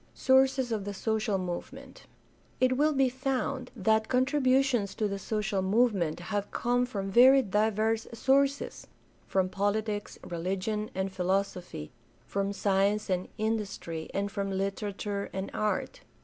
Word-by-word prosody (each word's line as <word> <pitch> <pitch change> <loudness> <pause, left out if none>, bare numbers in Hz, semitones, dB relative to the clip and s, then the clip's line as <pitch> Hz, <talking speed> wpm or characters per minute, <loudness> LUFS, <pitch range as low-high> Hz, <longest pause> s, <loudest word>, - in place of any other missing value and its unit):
Sources 265 -1 +3
of 215 -3 -1
the 205 0 -5
social 220 0 0
movement. 180 -2 -7 0.3
— - - -34
It 255 0 +3
will 300 +3 +3
be 270 -1 +3
found 260 0 -2
that 220 +1 +2
contributions 260 -4 +2
to 215 - 0
the 200 -1 -4
social 210 -1 -1
movement 195 -5 +2
have 205 +2 -3
come 245 +1 0
from 195 -5 -4
very 260 +5 +7
diverse 220 +2 +1
sources 275 +4 +1 0.2
— - - -34
from 190 -1 +1
politics, 205 +2 -2
religion, 195 +5 -2
and 190 +1 -1
philosophy, 185 - -2 0.3
from 200 0 -1
science 200 +1 +1
and 180 0 0
industry, 205 -7 -3
and 200 +1 -2
from 200 0 -2
literature 200 +1 -3
and 190 0 -4
art. 215 - -2
210 Hz, 135 wpm, -29 LUFS, 195-245 Hz, 0.3 s, very